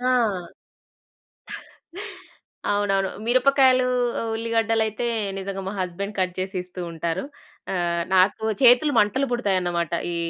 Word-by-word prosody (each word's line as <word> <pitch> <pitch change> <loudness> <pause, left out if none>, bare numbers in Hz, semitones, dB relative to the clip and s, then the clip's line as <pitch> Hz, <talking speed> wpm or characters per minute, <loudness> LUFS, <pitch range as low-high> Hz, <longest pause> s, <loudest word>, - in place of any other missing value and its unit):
ఆ! 230 -9 0 2.2
అవునవును. 195 -1 +1 0.2
మిరపకాయలూ, 255 +1 +4 0.5
ఉల్లిగడ్డలయితే 225 0 0 0.3
నిజంగా 195 0 -4
మా - - -2
హస్బెండ్ 190 +3 -4
కట్ 180 -1 0
చేసి 190 +1 -4
ఇస్తూ 180 0 -9
ఉంటారు. 165 +2 -3 0.5
ఆహ్, 170 -1 0
నాకు 190 +4 +3 0.2
చేతులు 250 +4 +6
మంటలు 210 +7 +2
పుడతాయనమాట. 180 -7 0 0.2
ఈ - - -3
200 Hz, 100 wpm, -24 LUFS, 185-240 Hz, 2.2 s, చేతులు